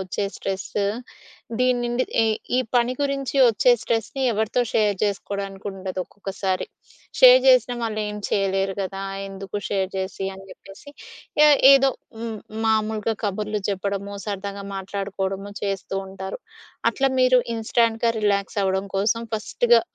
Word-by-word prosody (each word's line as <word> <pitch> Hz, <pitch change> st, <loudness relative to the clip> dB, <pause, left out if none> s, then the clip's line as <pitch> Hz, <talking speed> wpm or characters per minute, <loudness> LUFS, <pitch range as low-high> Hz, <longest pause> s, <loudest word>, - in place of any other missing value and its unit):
వచ్చే 190 Hz, +2 st, -3 dB
స్ట్రెసు, 195 Hz, +1 st, -3 dB, 0.8 s
దీని 250 Hz, -1 st, +3 dB
నుండి 240 Hz, +1 st, 0 dB, 0.2 s
ఎ -, -, +3 dB, 0.3 s
ఈ -, -, +3 dB, 0.2 s
పని 245 Hz, +1 st, +3 dB
గురించి 275 Hz, -1 st, -1 dB
వచ్చే 230 Hz, +2 st, +4 dB
స్ట్రెస్‌ని 230 Hz, +4 st, -2 dB
ఎవరితో 220 Hz, +3 st, 0 dB
షేర్ 210 Hz, -2 st, +3 dB
చేసుకోవడానికి 200 Hz, -1 st, -3 dB
ఉండదు 190 Hz, -1 st, -6 dB
ఒక్కొక్కసారి. 195 Hz, -1 st, -3 dB, 0.5 s
షేర్ -, -, +9 dB
చేసినా -, -, +5 dB
వాళ్ళు 215 Hz, -1 st, -2 dB
ఏం 210 Hz, -, -5 dB
చేయలేరు 195 Hz, -1 st, 0 dB
కదా! 195 Hz, +1 st, -5 dB, 0.3 s
ఎందుకు 195 Hz, +1 st, -7 dB
షేర్ 195 Hz, -2 st, -1 dB
చేసి 190 Hz, 0 st, -3 dB
అని 195 Hz, 0 st, -12 dB
చెప్పేసి 195 Hz, +10 st, -14 dB
ఆహ్, 460 Hz, -9 st, -4 dB
ఎ -, -, +7 dB, 0.2 s
ఏదో 275 Hz, 0 st, +5 dB, 0.3 s
హ్మ్, 225 Hz, -2 st, -4 dB, 0.3 s
మామూలుగా 220 Hz, 0 st, +1 dB
కబర్లు 210 Hz, +1 st, -2 dB
చెప్పడము, 200 Hz, +1 st, -3 dB
సరదాగా 200 Hz, 0 st, -4 dB
మాట్లాడుకోవడము 195 Hz, 0 st, -4 dB
చేస్తూ 195 Hz, -1 st, -3 dB
ఉంటారు. 190 Hz, -, -7 dB, 0.5 s
అట్లా 270 Hz, -1 st, +1 dB
మీరు 255 Hz, 0 st, +5 dB, 0.2 s
ఇన్‌స్టాంట్‌గా 230 Hz, +1 st, +1 dB
రిలాక్సఅవ్వడం 200 Hz, -1 st, 0 dB
కోసం 220 Hz, +4 st, +1 dB
ఫస్ట్‌గా 235 Hz, +2 st, +3 dB
205 Hz, 130 wpm, -23 LUFS, 195-230 Hz, 0.8 s, షేర్